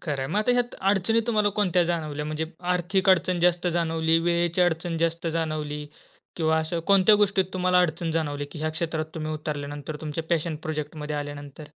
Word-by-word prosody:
खरं 150 -5 -3
आहे. - - -2
मग 205 - +2
आता 245 +3 +2
ह्यात 245 0 0 0.2
अडचणी 205 +4 +2
तुम्हाला 215 -3 +2
कोणत्या 185 -3 +3
जाणवल्या? 155 -3 -2
म्हणजे 155 +1 -2 0.3
आर्थिक 185 +2 0
अडचण 180 0 +3
जास्त 175 0 +2
जाणवली, 165 -1 +2
वेळेची 170 +1 +1
अडचण 170 -1 +1
जास्त 165 0 -1
जाणवली 150 -2 -2 0.5
किंवा 160 -1 +2
असं 160 +1 -2
कोणत्या 200 +1 +7
गोष्टीत 195 -2 +2
तुम्हाला 180 -1 +3
अडचण 165 +1 -3
जाणवली 145 -3 -1
की - - -8
ह्या 155 +1 -1
क्षेत्रात 160 -1 -3
तुम्ही 155 -1 -3
उतरल्यानंतर, 145 -1 -5
तुमच्या 160 +2 -3
पॅशन 165 -1 0
प्रोजेक्टमध्ये 150 -1 -4
आल्यानंतर? 145 0 -7
165 Hz, 175 wpm, -26 LUFS, 155-180 Hz, 0.5 s, कोणत्या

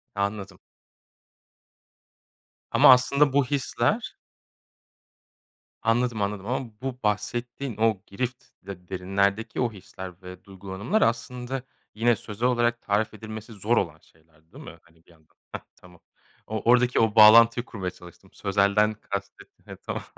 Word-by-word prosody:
Anladım. 100 -2 -3 2.1
Ama - - +7
aslında 140 +2 +2
bu 140 -2 +3
hisler 140 0 -1 1.7
Anladım, 115 -1 0
anladım. 100 -1 -3
Ama 125 -1 -3
bu 130 -1 -5
bahsettiğin 120 +4 -3
o 110 -4 +1
girift, 125 +5 -5 0.2
de 90 -3 -10
derinlerdeki 100 +4 -1
o 120 -2 0
hisler 95 -2 -11
ve 90 0 -11
duygulanımlar 100 - -3
aslında 125 +2 -1 0.3
yine 115 +1 +3
sözel 110 +4 -3
olarak 120 -1 +1
tarif 105 +2 -1
edilmesi 110 +1 -9
zor 105 +4 0
olan 80 -1 -1
şeyler 80 0 -29
değil - - -11
mi, - - -11
hani, 80 -1 -28
bir - - -22
yandan? 80 -2 -26 0.2
Hah, - - -6
tamam. 90 -2 -18 0.5
O 110 -1 -3
oradaki 125 0 +3
o 110 -1 +2
bağlantıyı 115 +2 +7
kurmaya 95 -4 -5
çalıştım. 90 -1 -16
Sözelden 100 +2 +2
kastettin 105 - -8
heh, - - -7
tamam. - - -4
110 Hz, 130 wpm, -25 LUFS, 95-120 Hz, 2.1 s, Ama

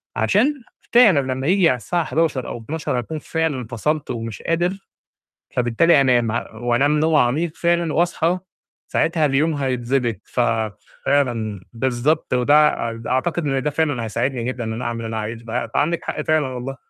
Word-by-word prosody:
عشان 210 - +2 0.4
فعلًا 220 -11 +7
لمّا 130 +2 -3
ييجي 185 -1 +4
على 130 - +2
الساعة 170 +7 -1
23:00 155 -6 0
أو - - -5
00:00 145 0 -3
أكون 155 +6 -5
فعلًا 150 -6 -2
فصلت 145 +5 -2
ومش 115 -2 -5
قادر، 175 +2 0 0.8
فبالتالي 125 +6 +4
أنام 120 -4 +3
ه 120 - -2
وأنام 120 +6 +1
نوم 160 0 +2
عميق 150 +6 +2
فعلًا، 170 -2 +1
واصحى 175 +1 +1 0.5
ساعتها 160 -2 +1
اليوم 150 +3 +2
هيتضبط، 125 -4 -1
ف - - -5 0.7
فعلًا 115 -8 0
بالضبط، 130 +5 0
وده 145 -1 +3
أد 115 0 -8
أعتقد 155 +6 0
إن 135 -2 0
ده - - +1
فعلًا 145 -5 0
هيساعدني 120 +3 -2
جدًا، 125 -1 -3
إن 110 0 -3
أنا 120 +2 -5
أعمل 120 0 -2
اللي - - -3
أنا 110 0 -4
عايزُه، 115 +2 -6
ب 115 0 -3
فعندِك 170 +4 0
حق 150 - -3
فعلًا 155 -2 +1
والله. 130 +1 -5
135 Hz, 165 wpm, -21 LUFS, 120-160 Hz, 0.8 s, فعلًا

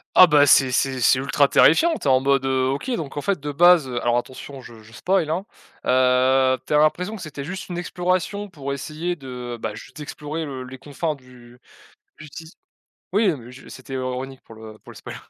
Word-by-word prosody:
Ah 185 - +10
bah, 145 -2 +5
c'est 130 -1 +5
c'est 130 +1 0
c'est 130 +2 +4
ultra 140 +1 +2
terrifiant, 325 - +4
tu 150 - -5
es - - +5
en 130 - +5
mode: 135 0 +1
«Heu, 130 -1 +1
OK, 140 - -3
donc, 150 -8 -6
en - - -1
fait, 195 +3 -1
de 145 +1 -5
base, 175 0 +5
heu» 120 -2 -3
alors 120 0 +1
attention, 130 +2 -7
je 115 -3 -13
je 110 +1 -18
spoil, 180 +3 0
hein. 175 +5 -2 0.4
Heu, 130 +1 +3
tu - - -3
as - - +5
l'impression 180 +7 +1
que 205 - -9
c'était 150 -4 -7
juste 185 +6 -7
une 175 - -5
exploration 185 +3 -2
pour 140 -5 -5
essayer 155 +5 -4
de, 125 -5 -7
bah, 105 -1 -4
juste 130 +6 -12
explorer 150 +2 -6
le 135 -3 -6
les 130 +1 -10
confins 150 +3 -4
du 125 -2 -18 0.6
du 150 - -11
ti 160 +3 -11 0.6
oui, 210 +1 +3
non, 170 - +1
mais 120 +1 -13
je 130 - -14
c'était 130 +1 -11
ironique 130 +1 -4
pour 115 - -15
le 110 -1 -12
pour - - -15
le - - -13
spoil. - - -9
140 Hz, 225 wpm, -22 LUFS, 130-160 Hz, 0.6 s, Ah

